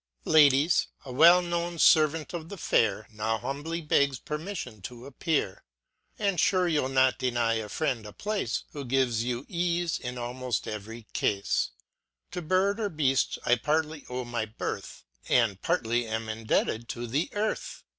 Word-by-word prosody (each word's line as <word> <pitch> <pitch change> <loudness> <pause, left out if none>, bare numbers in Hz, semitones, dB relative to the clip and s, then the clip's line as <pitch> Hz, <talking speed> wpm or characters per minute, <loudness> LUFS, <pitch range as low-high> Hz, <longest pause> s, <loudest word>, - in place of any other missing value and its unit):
Ladies, 150 +1 +5 0.2
a 130 - -7
well 170 +6 +7
known 170 0 -2
fervant 155 0 +4
of 165 -1 -5
the 200 - -7
fair 110 - +1
Now 110 +1 -1
humbly 145 +8 -4
begs 140 -3 +2
pcrmiflion 150 - -5
to 120 0 -9
appear* 140 - -2 0.5
And 200 -5 0
fure 185 -2 +3
you'll 145 -4 +1
not 130 -1 +3
deny 120 -2 +1
a 110 -2 -3
friend 135 -6 -1
a - - -9
place. 205 - -2
Who 145 - -6
gives 125 -3 +1
you 125 +2 -3
eafe 175 -1 -1
in 125 0 -5
aimoft 125 0 -3
every 110 +2 -7
cafe. 100 -1 0 0.6
To 180 - -4
bird 185 +5 +1
or 210 -2 0
beaft 140 -6 +1
I - - +4
partly 155 +3 -1
owe 125 0 -3
my 120 -2 -2
birth, 105 - -6 0.3
And 110 -6 +2
partly 120 +1 0
am 110 0 -3
indebted 110 +1 -1
to 120 0 -4
the 135 +8 -1
earth. 210 +1 -3
135 Hz, 155 wpm, -28 LUFS, 115-165 Hz, 0.6 s, well